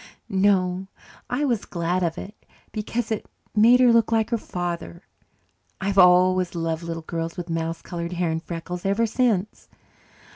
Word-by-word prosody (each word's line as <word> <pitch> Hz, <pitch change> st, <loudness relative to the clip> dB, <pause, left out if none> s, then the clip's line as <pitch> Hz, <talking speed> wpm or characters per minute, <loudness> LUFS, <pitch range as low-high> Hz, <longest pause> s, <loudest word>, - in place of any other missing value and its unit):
"No, 190 Hz, -1 st, +2 dB, 0.4 s
I 265 Hz, +4 st, 0 dB
was 235 Hz, -6 st, 0 dB
glad 175 Hz, +1 st, -1 dB
of 170 Hz, -2 st, -1 dB
it, 205 Hz, -, -7 dB, 0.4 s
because 225 Hz, +1 st, -3 dB
it 220 Hz, -, -2 dB, 0.3 s
made 230 Hz, +4 st, +6 dB
her 245 Hz, -2 st, +6 dB
look 230 Hz, -1 st, +3 dB
like 225 Hz, 0 st, +1 dB
her 235 Hz, -, +2 dB
father. 175 Hz, -1 st, -5 dB, 0.8 s
I've 195 Hz, 0 st, +1 dB
always 180 Hz, 0 st, +5 dB
loved 165 Hz, -1 st, -2 dB
little 165 Hz, -1 st, -5 dB
girls 165 Hz, +1 st, -4 dB
with 175 Hz, -1 st, -5 dB
mouse 165 Hz, 0 st, -3 dB
coloured 170 Hz, 0 st, -5 dB
hair 175 Hz, -1 st, 0 dB
and 160 Hz, 0 st, -2 dB
freckles 175 Hz, +1 st, -6 dB
ever 200 Hz, +4 st, +2 dB
since. 220 Hz, -4 st, 0 dB
185 Hz, 155 wpm, -24 LUFS, 170-215 Hz, 0.8 s, made